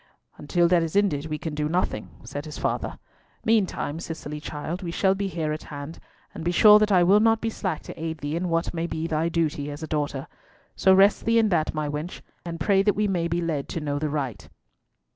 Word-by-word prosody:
"Until 170 +4 +2
that 175 -1 +4
is 165 +1 -3
ended 160 -8 +2
we 155 -1 -3
can 160 0 -5
do 150 0 -1
nothing," 170 -10 -1
said 145 +6 -6
his 150 -1 -7
father. - - -2 0.5
"Meantime, 195 -8 +1
Cicely 160 -3 -6
child, 155 +4 -5
we 175 - -4
shall 190 +3 +2
be 195 0 -2
here 160 -4 -2
at 155 - -5
hand, 145 +2 -8 0.3
and - - -7
be 170 - 0
sure 210 +4 +8
that 215 0 +2
I 180 -2 +5
will 195 +4 +5
not 225 0 +4
be 225 0 -2
slack 185 -7 -3
to 160 - -8
aid 160 0 -3
thee 145 +1 -4
in 175 +1 -1
what 165 +1 0
may 170 0 -2
be 160 -1 -3
thy 165 0 0
duty 155 -4 -1
as 145 +2 -7
a - - -4
daughter. 145 -3 -2 0.5
So 190 - +4
rest 195 +2 +4
thee 230 0 +3
in 225 -2 +4
that, 160 -4 0
my 155 -1 -1
wench, 150 +4 -5 0.2
and 170 -1 -6
pray 195 +4 +3
that 205 +1 +2
we 210 0 +1
may 175 -4 0
be 170 +1 -1
led 155 -5 -2
to - - -3
know 145 -2 -2
the 155 0 -1
right." 130 - -4
165 Hz, 235 wpm, -25 LUFS, 150-185 Hz, 0.5 s, sure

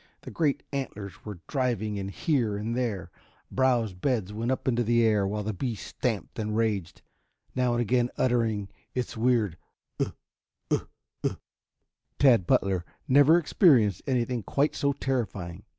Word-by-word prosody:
The - - -9
great 150 -4 0
antlers 105 -9 -5
were 100 -5 -7
driving 120 -7 -1
in 95 -1 -3
here 110 - 0
and 110 +3 -3
there; 115 -8 -2 0.4
browse 125 -6 +2
beds 105 0 -1
went 115 +3 -2
up 130 - -1
into 120 -1 +2
the 115 +1 +3
air, 105 -3 +3
while 105 +1 -2
the 110 +1 -2
beast 115 +2 -4
stamped 115 -2 -3
and 105 0 -1
raged, 105 -7 -1 0.5
now 125 -1 +1
and 120 - +1
again 120 +1 +2
uttering 115 -5 +1 0.3
its 125 -2 -2
weird 110 -7 +1 0.4
"Ugh, - - -1 0.6
ugh, - - 0 0.3
ugh!" - - -1 0.8
Tad 120 -10 +5
Butler 95 -1 +3
had 85 - -19
never 145 +5 +7
experienced 135 - +4
anything 125 -2 0
quite 140 +8 +1
so 140 - +1
terrifying. 105 -9 -3
115 Hz, 150 wpm, -28 LUFS, 105-130 Hz, 0.8 s, never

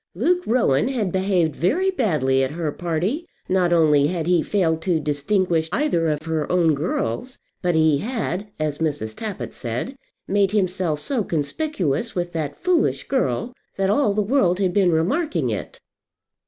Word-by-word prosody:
Luke 345 - +2
Rowan 220 - +2
had 230 -8 -1
behaved 185 -5 +1
very 350 - +1
badly 150 - +1
at 130 - 0
her 160 -3 -1
party. 175 - -2 0.2
Not 185 -2 +2
only 150 -4 +4
had 165 -1 -2
he 175 -1 +3
failed 165 -5 0
to 170 -1 +1
distinguish 160 +3 0
either 195 - +1
of 150 -1 -1
her 160 -2 -2
own 170 -3 +3
girls, 150 - -2 0.2
but 175 -2 +1
he 155 -3 +4
had, 210 - -3
as 155 -2 -2
Mrs. 145 -9 -2
Tappitt 210 -4 -5
said, 125 - -4 0.3
made 200 0 +2
himself 185 -6 0
so 240 - -1
conspicuous 175 - -2
with 175 -1 -2
that 155 -4 -3
foolish 350 -2 +1
girl, 245 - -1 0.2
that 195 0 +1
all 210 -3 +2
the 210 - +2
world 200 -6 +2
had 185 -2 0
been 190 -3 +3
remarking 165 - 0
it. 105 - -5
175 Hz, 160 wpm, -22 LUFS, 155-210 Hz, 0.3 s, only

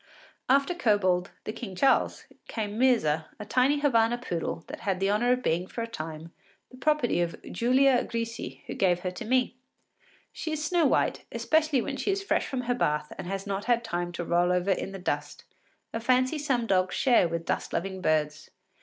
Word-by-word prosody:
After 275 +6 +3
Kobold, 200 - +2
the 215 - -4
King 205 -7 -7
Charles, 270 +8 +2 0.2
came 210 -2 -4
Myrza, 165 -12 +3
a 210 - -6
tiny 260 +6 +2
Havana 235 -4 +3
poodle 170 -8 -4
that - - -8
had 190 -2 -1
the 195 +1 +1
honour 240 +4 +2
of 250 0 -3
being 175 +3 0
for 230 - -4
a - - -4
time 160 -5 -7 0.4
the 255 - -13
property 270 - +1
of 170 -1 -2
Giulia 255 +4 +3
Grisi, 230 0 -5
who - - -5
gave 180 -2 +2
her 185 - -2
to 180 - -7
me. 250 +1 +1 0.8
She 315 - -4
is 305 0 -2
snow 335 -1 +3
white, - - +1
especially 310 -5 +2
when 275 - -4
she - - -2
is 390 0 0
fresh - - 0
from 260 -2 -2
her 245 0 0
bath 150 -10 -1
and - - -5
has 195 +1 -4
not 200 0 -3
had 240 -1 +2
time 175 -5 -3
to 175 - -4
roll 175 +1 +2
over 180 +2 +1
in 195 - -1
the 195 - -6
dust, 145 -5 -3 0.5
a 225 - -1
fancy 255 +5 +2
some 265 -5 0
dogs 185 -3 +1
share 240 -9 +4
with 165 0 -4
dust - - -2
loving 190 +2 -3
birds. 155 -2 0
220 Hz, 200 wpm, -28 LUFS, 180-255 Hz, 0.8 s, share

